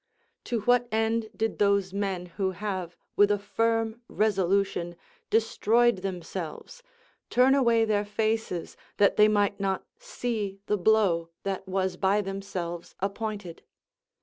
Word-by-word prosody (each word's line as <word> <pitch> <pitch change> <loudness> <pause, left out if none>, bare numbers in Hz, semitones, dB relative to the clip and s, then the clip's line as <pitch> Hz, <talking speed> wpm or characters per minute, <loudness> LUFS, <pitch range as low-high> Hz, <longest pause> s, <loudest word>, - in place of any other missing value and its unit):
To 235 -3 -1
what 245 +2 +3
end 225 0 0
did 225 -1 -2
those 200 -2 +2
men 195 -3 -2
who 190 +2 -2
have, 185 -5 -4 0.2
with 205 0 +5
a 205 - +3
firm 225 +2 -1
resolution, 195 -3 +1 0.3
destroyed 230 +1 +3
themselves, 185 - -6 0.5
turn 255 +2 +5
away 235 -4 +4
their 210 -1 +1
faces 215 -3 -2 0.2
that 200 - +4
they 210 - +6
might 205 -1 +1
not 195 -1 -1
see 235 - -3
the 210 - +1
blow 180 -5 +3
that 195 -1 -3
was 190 0 -1
by 195 +2 +2
themselves 185 -3 -5
appointed? 200 -2 -4
205 Hz, 125 wpm, -27 LUFS, 190-225 Hz, 0.5 s, they